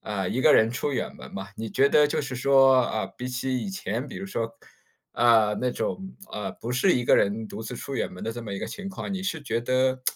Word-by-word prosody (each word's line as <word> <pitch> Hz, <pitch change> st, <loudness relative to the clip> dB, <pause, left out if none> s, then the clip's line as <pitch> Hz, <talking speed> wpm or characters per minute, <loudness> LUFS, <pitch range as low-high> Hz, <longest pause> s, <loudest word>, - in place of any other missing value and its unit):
啊， 100 Hz, -3 st, -3 dB
一 120 Hz, -, -1 dB
个 150 Hz, +3 st, +6 dB
人 110 Hz, -, +5 dB
出 140 Hz, +3 st, -2 dB
远 130 Hz, -, -3 dB
门 -, -, -12 dB
嘛。 95 Hz, +1 st, -6 dB
你 110 Hz, -1 st, -5 dB
觉 135 Hz, +1 st, +4 dB
得 150 Hz, 0 st, +5 dB
就 -, -, 0 dB
是 135 Hz, -3 st, -5 dB
说， 135 Hz, +1 st, +5 dB
啊， 110 Hz, -4 st, -2 dB
比 125 Hz, +5 st, -7 dB
起 130 Hz, +1 st, -1 dB
以 195 Hz, -, -3 dB
前 130 Hz, -, -3 dB
比 -, -, -8 dB
如 195 Hz, -, -5 dB
说， 115 Hz, -11 st, -3 dB, 0.6 s
呃， 110 Hz, -3 st, +4 dB
那 125 Hz, -, +1 dB
种， 190 Hz, +8 st, -4 dB, 0.2 s
呃， 100 Hz, -2 st, -3 dB
不 115 Hz, +5 st, -6 dB
是 155 Hz, +10 st, +3 dB
一 125 Hz, -, +1 dB
个 -, -, +5 dB
人 105 Hz, +2 st, +1 dB
独 110 Hz, -, -7 dB
自 120 Hz, +3 st, -6 dB
出 140 Hz, -, -6 dB
远 -, -, -2 dB
门 90 Hz, -, -8 dB
的 115 Hz, -, -2 dB
这 120 Hz, +1 st, -7 dB
么 105 Hz, -, -6 dB
一 100 Hz, -, -3 dB
个 -, -, -4 dB
情 200 Hz, -1 st, -6 dB
况， 195 Hz, +1 st, -5 dB
你 190 Hz, -, -4 dB
是 165 Hz, -4 st, -2 dB
觉 115 Hz, -5 st, -2 dB
得 130 Hz, +1 st, +1 dB
125 Hz, 280 characters per minute, -26 LUFS, 110-140 Hz, 0.6 s, 个